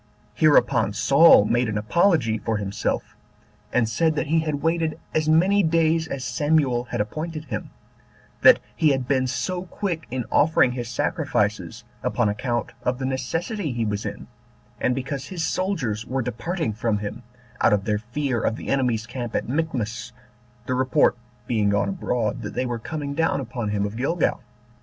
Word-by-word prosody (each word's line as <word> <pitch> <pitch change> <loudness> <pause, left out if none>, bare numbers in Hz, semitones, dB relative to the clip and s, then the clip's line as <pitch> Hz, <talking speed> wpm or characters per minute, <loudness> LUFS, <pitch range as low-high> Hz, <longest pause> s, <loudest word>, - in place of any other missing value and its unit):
Hereupon 135 -8 +3
Saul 135 +2 +6
made 120 +1 +1
an 105 - -2
apology 115 - +2
for 115 -2 -1
himself, 100 -1 -3 0.6
and 120 -2 +2
said 160 +8 +1
that - - 0
he 160 +3 +2
had 155 -3 -2
waited 165 -1 0 0.2
as 155 0 +1
many 185 +6 +4
days 165 -1 +2
as 135 -4 -4
Samuel 130 -2 +1
had - - -4
appointed 155 +9 -4
him; 110 -6 -5 0.7
that - - +8 0.2
he 155 - +3
had 135 -3 0
been 130 -1 +1
so 175 +8 -2
quick 175 -2 -4
in 125 -1 -3
offering 150 -4 +4
his 120 -2 -5
sacrifices, 110 0 -1 0.2
upon 120 -3 +1
account 120 +2 -2
of 125 0 -1
the 130 - -3
necessity 150 - -2
he 115 -1 -1
was 105 -1 -2
in, - - -6 0.5
and 125 - +1
because 135 +1 -4
his 175 -4 -3
soldiers 160 - -1
were 130 +2 -2
departing 125 - -2
from 110 0 0
him, 105 +3 -5 0.4
out - - +5
of 105 -1 +1
their 105 -1 0
fear 120 +1 -2
of 110 - 0
the - - -7
enemy's 125 -5 +1
camp 120 -1 -5
at - - -1
Michmash, 125 -5 -2 0.5
the 130 - -1
report 130 0 +3 0.3
being 110 -4 +1
gone 100 0 +1
abroad 125 - -2
that 105 - -6
they 130 - 0
were 120 -1 -3
coming 145 +2 -4
down 160 -1 +1
upon 120 -4 -4
him 100 -1 0
of 100 +1 -5
Gilgal. 155 +7 0
130 Hz, 170 wpm, -24 LUFS, 115-155 Hz, 0.7 s, that